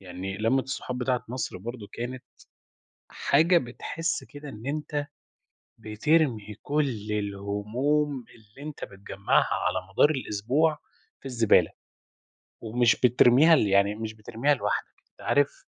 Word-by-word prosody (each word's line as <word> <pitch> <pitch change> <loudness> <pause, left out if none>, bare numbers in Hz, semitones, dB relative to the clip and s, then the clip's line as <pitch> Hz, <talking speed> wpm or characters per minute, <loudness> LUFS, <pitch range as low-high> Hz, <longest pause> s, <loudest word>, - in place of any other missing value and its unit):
يعني 95 +1 -6
لمّة 125 +5 +2
الصحاب 125 -2 -5
بتاعة 125 -1 -1
مصر 125 -5 -4
برضه 115 +1 -7
كانت 125 +2 -6 0.8
حاجة 165 +5 +3
بتحس 165 +6 -4
كده 145 0 -11
إن 110 0 -10
أنت 145 0 -3 0.7
بترمي 110 -1 0
كُلّ 135 -8 -1
الهموم 105 +8 -1
اللي 115 +7 -12
أنت 150 - -9
بتجمَّعها 100 0 0
على - - -1 0.2
مدار 145 - +5
الأسبوع 135 +5 0 0.4
في - - -24
الزبالة، 115 -9 +3 0.9
ومش 115 +1 +2
بترميها 125 +6 +6
ل 110 - +2
يعني 100 +1 +3
مش 110 0 -5
بترميها 115 +6 0
لوحدَك، - - -3 0.2
أنت - - -23
عارف 145 0 +1
125 Hz, 120 wpm, -27 LUFS, 105-145 Hz, 0.9 s, بترميها